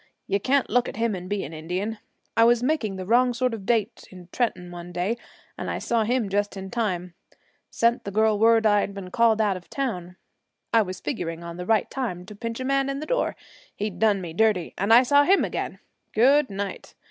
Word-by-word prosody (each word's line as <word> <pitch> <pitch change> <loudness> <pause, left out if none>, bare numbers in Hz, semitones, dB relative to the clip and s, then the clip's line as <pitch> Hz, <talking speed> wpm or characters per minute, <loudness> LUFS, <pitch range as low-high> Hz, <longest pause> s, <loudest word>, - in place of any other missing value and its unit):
You 200 +1 0
can't 270 +5 +2
look 245 0 +1
at - - -8
him 225 0 0
and 185 -1 -6
be 205 -1 -1
an 150 - -7
Indian. 180 +8 -4 0.4
I 230 - +5
was 240 +1 +4
making 250 -8 0
the 185 -1 -6
wrong 245 +4 +3
sort 250 0 0
of 200 -4 -7
date 230 -1 0
in 180 -2 -13
Trenton 180 -8 -2
one 175 0 -8
day, 180 +6 -1 0.4
and - - -4
I - - -2
saw 230 -2 0
him 245 -1 +1
just 205 +1 -1
in 190 0 -7
time 180 -7 -2 0.6
sent 235 +1 +1
the - - -5
girl 215 +1 +2
word 225 0 +5
I'd 205 -1 +2
been 185 -2 -7
called 230 -1 +3
out 205 -4 +2
of 175 - -14
town. 180 -10 -3 0.6
I 230 - +6
was 185 -3 -4
figuring 170 - -4
on 170 0 -7
the 180 0 -6
right 220 -2 +3
time 205 -10 -3
to 210 +2 -11
pinch 230 +2 -5
a 255 - -3
man 275 0 +1
in 275 0 -3
the 305 - -5
door, - - 0 0.4
he'd 210 -1 -4
done 210 -3 +3
me 170 -3 -6
dirty, 210 -3 +1
and 200 +3 0
I 240 +3 +8
saw 285 +3 +5
him 385 +6 +4
again. - - -4 0.4
Good 270 +5 +5
night! 200 -1 -6
215 Hz, 220 wpm, -25 LUFS, 185-240 Hz, 0.6 s, I